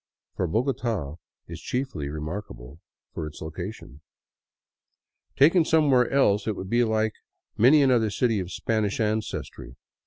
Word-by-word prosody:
For 90 Hz, -, -1 dB
Bogota 110 Hz, -, -2 dB, 0.3 s
is 85 Hz, 0 st, -8 dB
chiefly 125 Hz, -, -3 dB
remarkable 75 Hz, -, -7 dB, 0.3 s
for 80 Hz, -, -4 dB
its 75 Hz, -, -10 dB
location. 80 Hz, -2 st, -8 dB, 1.3 s
Taken 165 Hz, +5 st, +5 dB
somewhere 145 Hz, -6 st, +3 dB
else 110 Hz, -7 st, +2 dB
it 110 Hz, -, 0 dB
would 95 Hz, 0 st, -7 dB
be 120 Hz, +1 st, +3 dB
like 110 Hz, -1 st, 0 dB, 0.4 s
many 140 Hz, +6 st, +6 dB
another 120 Hz, -5 st, +3 dB
city 110 Hz, +1 st, 0 dB
of 90 Hz, -1 st, -5 dB
Spanish 110 Hz, -3 st, -1 dB
ancestry. 110 Hz, -, -3 dB
110 Hz, 125 wpm, -25 LUFS, 85-125 Hz, 1.3 s, many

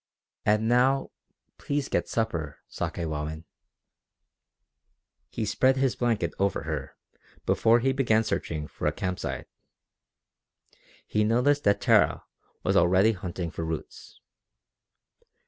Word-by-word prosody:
"And 105 Hz, +1 st, +3 dB
now 130 Hz, +3 st, +3 dB, 0.5 s
please 145 Hz, -1 st, -2 dB
get -, -, -1 dB
supper, 85 Hz, -11 st, -2 dB
Sakewawin." 80 Hz, -1 st, -4 dB, 1.9 s
He 110 Hz, -, -3 dB
spread 130 Hz, +6 st, +2 dB
his 130 Hz, -2 st, +1 dB
blanket 115 Hz, -9 st, 0 dB
over 100 Hz, -5 st, 0 dB
her 75 Hz, -4 st, -5 dB, 0.5 s
before 115 Hz, +1 st, +4 dB
he 135 Hz, +2 st, +2 dB
began 115 Hz, -5 st, +2 dB
searching 75 Hz, -7 st, -3 dB
for -, -, -4 dB
a -, -, +3 dB
camp 90 Hz, -1 st, -3 dB
site. -, -, -4 dB, 1.6 s
He 105 Hz, -, +1 dB
noticed 125 Hz, +7 st, +2 dB
that 100 Hz, 0 st, +3 dB
Tara -, -, +3 dB, 0.4 s
was -, -, +1 dB
already 95 Hz, +5 st, +5 dB
hunting 90 Hz, -4 st, -5 dB
for 80 Hz, -, -5 dB
roots. 80 Hz, -1 st, -7 dB
105 Hz, 110 wpm, -27 LUFS, 85-120 Hz, 1.9 s, already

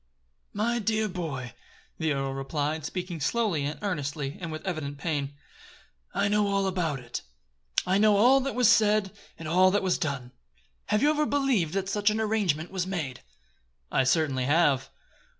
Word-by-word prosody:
"My 235 Hz, +3 st, 0 dB
dear 215 Hz, 0 st, 0 dB
boy," 150 Hz, -, -5 dB, 0.5 s
the 160 Hz, -2 st, +1 dB
earl 135 Hz, -1 st, -2 dB
replied, 145 Hz, +3 st, -2 dB
speaking 180 Hz, 0 st, -4 dB
slowly 200 Hz, -6 st, 0 dB
and 150 Hz, +2 st, -3 dB
earnestly 145 Hz, -6 st, -3 dB
and 165 Hz, -2 st, -4 dB
with 155 Hz, +3 st, -7 dB
evident 155 Hz, -6 st, -3 dB
pain, 145 Hz, -2 st, -2 dB, 0.8 s
"I 200 Hz, -, +1 dB
know 210 Hz, 0 st, +2 dB
all 200 Hz, -1 st, +1 dB
about 180 Hz, -6 st, -1 dB
it; 120 Hz, -1 st, -6 dB, 0.6 s
I 190 Hz, +2 st, +2 dB
know 210 Hz, -1 st, +5 dB
all 250 Hz, +6 st, +6 dB
that 275 Hz, 0 st, -3 dB
was 250 Hz, -2 st, +4 dB
said, 210 Hz, -2 st, +4 dB, 0.3 s
and 165 Hz, -, -7 dB
all 185 Hz, +4 st, +5 dB
that 205 Hz, +1 st, +1 dB
was 185 Hz, -2 st, +1 dB
done. 140 Hz, -5 st, -3 dB, 0.6 s
Have 210 Hz, +3 st, +1 dB
you 300 Hz, -, +5 dB
ever 300 Hz, 0 st, +1 dB
believed 255 Hz, -, +1 dB
that 195 Hz, -1 st, -1 dB
such 205 Hz, +1 st, +2 dB
an 215 Hz, +1 st, -1 dB
arrangement 200 Hz, -8 st, 0 dB
was 185 Hz, -1 st, -2 dB
made?" 155 Hz, -10 st, -3 dB, 0.7 s
"I 135 Hz, -, +3 dB
certainly 135 Hz, -2 st, +1 dB
have." 145 Hz, -3 st, +2 dB
180 Hz, 170 wpm, -27 LUFS, 145-210 Hz, 0.8 s, all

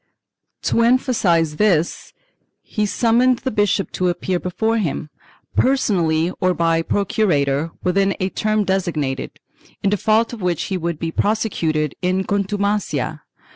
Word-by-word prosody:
To 230 Hz, -, +2 dB
emphasize 205 Hz, -, +2 dB
this 175 Hz, -6 st, +1 dB, 0.5 s
he 210 Hz, -1 st, -2 dB
summoned 240 Hz, +4 st, +3 dB
the 260 Hz, +1 st, -3 dB
bishop 205 Hz, -2 st, +1 dB
to 180 Hz, -1 st, 0 dB
appear 175 Hz, +1 st, -1 dB
before 220 Hz, +6 st, -1 dB
him, 155 Hz, -4 st, -3 dB, 0.4 s
personally 175 Hz, -11 st, +2 dB
or 185 Hz, -1 st, +2 dB
by 165 Hz, -1 st, +2 dB
procurator, 165 Hz, -7 st, 0 dB
within 195 Hz, +2 st, +2 dB
a 185 Hz, -, 0 dB
term 215 Hz, +1 st, 0 dB
designated, 170 Hz, -9 st, -2 dB, 0.4 s
in 200 Hz, -, +2 dB
default 220 Hz, +3 st, +2 dB
of 230 Hz, -, -7 dB
which 180 Hz, -3 st, 0 dB
he -, -, +1 dB
would 170 Hz, -2 st, -3 dB
be 165 Hz, +1 st, -3 dB
prose 215 Hz, +5 st, +1 dB
cuted 155 Hz, -8 st, -1 dB
in 185 Hz, +1 st, +1 dB
contumacia. 200 Hz, -8 st, -1 dB
190 Hz, 135 wpm, -20 LUFS, 165-215 Hz, 0.5 s, summoned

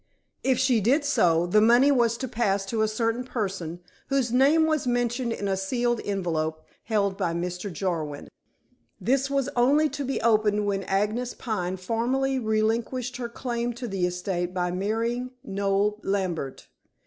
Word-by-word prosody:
If 260 Hz, -2 st, +2 dB
she 255 Hz, -3 st, +3 dB
did 275 Hz, +8 st, +2 dB
so, 170 Hz, -, +3 dB
the 210 Hz, +5 st, +4 dB
money 240 Hz, +6 st, +6 dB
was 235 Hz, -4 st, +2 dB
to 260 Hz, -, -4 dB
pass 205 Hz, -5 st, 0 dB
to 220 Hz, +2 st, -1 dB
a 220 Hz, -, +3 dB
certain 230 Hz, +2 st, -1 dB
person, 190 Hz, -8 st, -4 dB, 0.3 s
whose 270 Hz, -4 st, +1 dB
name 280 Hz, +6 st, +5 dB
was 310 Hz, -4 st, 0 dB
mentioned 245 Hz, 0 st, 0 dB
in 205 Hz, -3 st, -3 dB
a 195 Hz, -, +1 dB
sealed 240 Hz, +5 st, 0 dB
envelope 160 Hz, -5 st, -2 dB, 0.2 s
held 200 Hz, -3 st, 0 dB
by 170 Hz, -3 st, 0 dB
Mr. 180 Hz, +3 st, -3 dB
Jarwin. 160 Hz, -6 st, -3 dB, 0.7 s
This 265 Hz, +7 st, +1 dB
was 275 Hz, -2 st, 0 dB
only 285 Hz, +6 st, +4 dB
to 285 Hz, -, -4 dB
be 270 Hz, 0 st, -2 dB
opened 215 Hz, -2 st, +3 dB
when 200 Hz, -1 st, 0 dB
Agnes 215 Hz, +5 st, -1 dB
Pine 190 Hz, -6 st, -3 dB
formally 250 Hz, +7 st, 0 dB
relinquished 230 Hz, +3 st, -1 dB
her 240 Hz, -2 st, -4 dB
claim 240 Hz, 0 st, -3 dB
to 240 Hz, +1 st, -6 dB
the 190 Hz, -4 st, 0 dB
estate 180 Hz, 0 st, -3 dB
by 180 Hz, -1 st, 0 dB
marrying 230 Hz, +6 st, -2 dB
Noel 200 Hz, 0 st, 0 dB
Lambert. 180 Hz, -9 st, -2 dB
220 Hz, 160 wpm, -26 LUFS, 190-250 Hz, 0.7 s, money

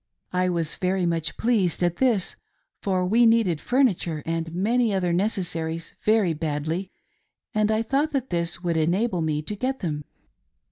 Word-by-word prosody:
I 180 Hz, 0 st, +2 dB
was 165 Hz, -3 st, -1 dB
very 185 Hz, 0 st, 0 dB
much 165 Hz, -2 st, -1 dB
pleased 205 Hz, -8 st, +1 dB
at 175 Hz, -1 st, +1 dB
this, 235 Hz, -8 st, +1 dB, 0.5 s
for 185 Hz, -2 st, 0 dB
we 230 Hz, +5 st, +5 dB
needed 220 Hz, -9 st, +3 dB
furniture 195 Hz, -, +1 dB
and 165 Hz, 0 st, -2 dB
many 220 Hz, +6 st, +1 dB
other 180 Hz, -3 st, +1 dB
necessaries 165 Hz, -4 st, -2 dB
very 215 Hz, -6 st, +3 dB
badly, 160 Hz, +4 st, -3 dB, 0.6 s
and 215 Hz, 0 st, +2 dB
I 220 Hz, +1 st, +2 dB
thought 280 Hz, +6 st, 0 dB
that 265 Hz, -2 st, -2 dB
this 170 Hz, +1 st, -1 dB
would 170 Hz, -2 st, 0 dB
enable 180 Hz, +4 st, +1 dB
me 155 Hz, -1 st, -1 dB
to 210 Hz, -, -5 dB
get 260 Hz, +5 st, -2 dB
them. 150 Hz, -5 st, -3 dB
180 Hz, 155 wpm, -25 LUFS, 165-220 Hz, 0.6 s, we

